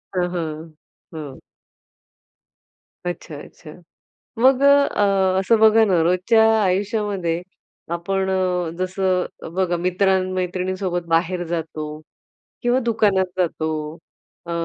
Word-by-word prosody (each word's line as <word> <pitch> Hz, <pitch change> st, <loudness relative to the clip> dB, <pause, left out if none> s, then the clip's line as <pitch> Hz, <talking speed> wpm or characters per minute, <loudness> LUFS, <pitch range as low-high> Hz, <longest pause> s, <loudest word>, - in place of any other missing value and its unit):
हां, 180 Hz, -1 st, +1 dB
हां, 160 Hz, -1 st, -5 dB, 0.4 s
हं. 150 Hz, -4 st, -8 dB, 1.7 s
अच्छा, 170 Hz, -3 st, -5 dB
अच्छा. 155 Hz, -, -14 dB, 0.7 s
मग 260 Hz, +2 st, +4 dB
अ, -, -, +6 dB, 0.3 s
अ, 190 Hz, -2 st, +2 dB
असं 220 Hz, +4 st, +3 dB
बघा 220 Hz, 0 st, +6 dB
ना 185 Hz, -5 st, +2 dB
रोजच्या 185 Hz, +6 st, +3 dB, 0.2 s
आयुष्यामध्ये 195 Hz, -3 st, -1 dB, 0.5 s
आपण 190 Hz, +3 st, -1 dB
अ, 180 Hz, -3 st, 0 dB
जसं 185 Hz, 0 st, 0 dB, 0.3 s
बघा 185 Hz, -2 st, 0 dB
मित्र-मैत्रिणींसोबत 185 Hz, 0 st, -1 dB
बाहेर 175 Hz, +2 st, +1 dB
जातो 160 Hz, -2 st, -4 dB, 0.8 s
किंवा 245 Hz, +1 st, +2 dB
दुकानात 210 Hz, -5 st, +2 dB, 0.2 s
जातो. 160 Hz, -2 st, -1 dB, 0.8 s
अ, -, -, -6 dB
185 Hz, 100 wpm, -21 LUFS, 170-195 Hz, 1.7 s, अ